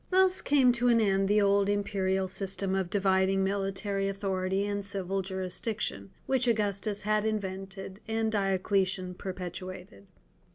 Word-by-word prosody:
Thus 375 Hz, 0 st, +4 dB
came 270 Hz, -3 st, +4 dB
to 245 Hz, 0 st, 0 dB
an 235 Hz, -1 st, +5 dB
end 195 Hz, -2 st, +2 dB
the 210 Hz, +1 st, +4 dB
old 200 Hz, 0 st, +3 dB
imperial 195 Hz, -2 st, 0 dB
system 195 Hz, 0 st, -1 dB
of 190 Hz, -2 st, 0 dB
dividing 190 Hz, 0 st, +2 dB
military 195 Hz, 0 st, -1 dB
authority 195 Hz, 0 st, -1 dB
and 205 Hz, 0 st, -2 dB
civil 195 Hz, -1 st, -2 dB
jurisdiction, 185 Hz, -, -3 dB, 0.2 s
which 260 Hz, -2 st, +1 dB
Augustus 205 Hz, -2 st, 0 dB
had 215 Hz, 0 st, +1 dB
invented 195 Hz, -2 st, -4 dB
and 220 Hz, 0 st, 0 dB
Diocletian 190 Hz, -2 st, 0 dB
perpetuated. 180 Hz, -, -7 dB
195 Hz, 130 wpm, -29 LUFS, 190-210 Hz, 0.2 s, an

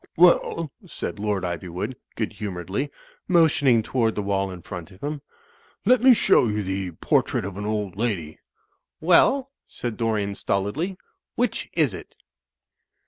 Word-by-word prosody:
"Well," 165 Hz, -2 st, +4 dB, 0.2 s
said 110 Hz, -, -5 dB
Lord 105 Hz, -2 st, -1 dB
Ivywood, 90 Hz, +6 st, -4 dB, 0.2 s
good 110 Hz, -, -2 dB
humotu 100 Hz, -5 st, -5 dB
edly, 135 Hz, +10 st, -2 dB, 0.4 s
mo 170 Hz, -3 st, +6 dB
tioning 135 Hz, -7 st, +3 dB
toward 115 Hz, -1 st, 0 dB
the 105 Hz, -, -2 dB
wall 100 Hz, -1 st, 0 dB
in 90 Hz, -2 st, -9 dB
front 90 Hz, -2 st, -7 dB
of 95 Hz, -1 st, -16 dB
him, 145 Hz, 0 st, -3 dB, 0.6 s
"let 255 Hz, -1 st, +5 dB
me 255 Hz, -1 st, +8 dB
show 125 Hz, -, +4 dB
you 105 Hz, -1 st, -1 dB
the 95 Hz, 0 st, -2 dB
'Portrait 80 Hz, -, +1 dB
of 100 Hz, -2 st, -6 dB
an 105 Hz, +1 st, -4 dB
Old 105 Hz, -4 st, -2 dB
Lady.' 95 Hz, -9 st, -2 dB, 0.3 s
" -, -, -51 dB
"Well," 265 Hz, +9 st, +5 dB, 0.2 s
said 120 Hz, -3 st, -5 dB
Dorian, 110 Hz, -4 st, 0 dB
stolidly, 105 Hz, -, -1 dB, 0.4 s
"which 245 Hz, -1 st, -1 dB
is 150 Hz, -, +2 dB
it?" -, -, -10 dB
105 Hz, 155 wpm, -24 LUFS, 95-145 Hz, 0.6 s, me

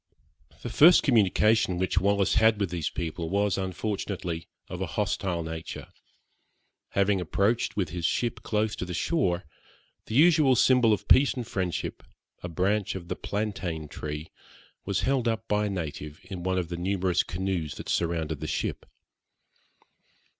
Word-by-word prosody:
The -, -, -4 dB
first 170 Hz, +4 st, +7 dB
communication 105 Hz, -4 st, +3 dB
which 95 Hz, +1 st, +1 dB
Wallis 100 Hz, +1 st, +2 dB
had 110 Hz, 0 st, +4 dB
with 100 Hz, -4 st, -1 dB
these 85 Hz, -4 st, -2 dB
people 80 Hz, 0 st, -4 dB
was 100 Hz, +1 st, +1 dB
unfortunately 95 Hz, -3 st, -3 dB, 0.2 s
of -, -, -6 dB
a -, -, -1 dB
hostile 85 Hz, -3 st, -1 dB
nature. 80 Hz, 0 st, -7 dB, 1.0 s
Having 100 Hz, -1 st, +2 dB
approached 100 Hz, +7 st, 0 dB
with 100 Hz, -3 st, -1 dB
his 85 Hz, +1 st, -5 dB
ship 115 Hz, +6 st, 0 dB
close 105 Hz, 0 st, -1 dB
to -, -, -3 dB
the 90 Hz, -1 st, -5 dB
shore, 95 Hz, -, 0 dB, 0.6 s
the 110 Hz, -, -4 dB
usual 155 Hz, -3 st, +5 dB
symbol 125 Hz, -2 st, +4 dB
of 105 Hz, -1 st, -1 dB
peace 140 Hz, +1 st, +5 dB
and 125 Hz, -2 st, -4 dB
friendship, 90 Hz, -3 st, -3 dB, 0.4 s
a 90 Hz, -, -5 dB
branch 95 Hz, +5 st, 0 dB
of 85 Hz, -2 st, -7 dB
the -, -, -2 dB
plantain 95 Hz, -7 st, -3 dB
tree, 75 Hz, +2 st, -6 dB, 0.5 s
was 100 Hz, 0 st, 0 dB
held 130 Hz, -3 st, +1 dB
up 115 Hz, -1 st, -1 dB
by 105 Hz, 0 st, +1 dB
a -, -, -3 dB
native 75 Hz, -4 st, -5 dB
in 90 Hz, -1 st, -7 dB
one 95 Hz, +1 st, -1 dB
of 90 Hz, -2 st, -2 dB
the 85 Hz, -, -4 dB
numerous 95 Hz, 0 st, +1 dB
canoes 85 Hz, -5 st, -3 dB
that -, -, -8 dB
surrounded 80 Hz, -3 st, -1 dB
the -, -, -5 dB
ship. -, -, -3 dB
95 Hz, 155 wpm, -27 LUFS, 85-105 Hz, 1.0 s, first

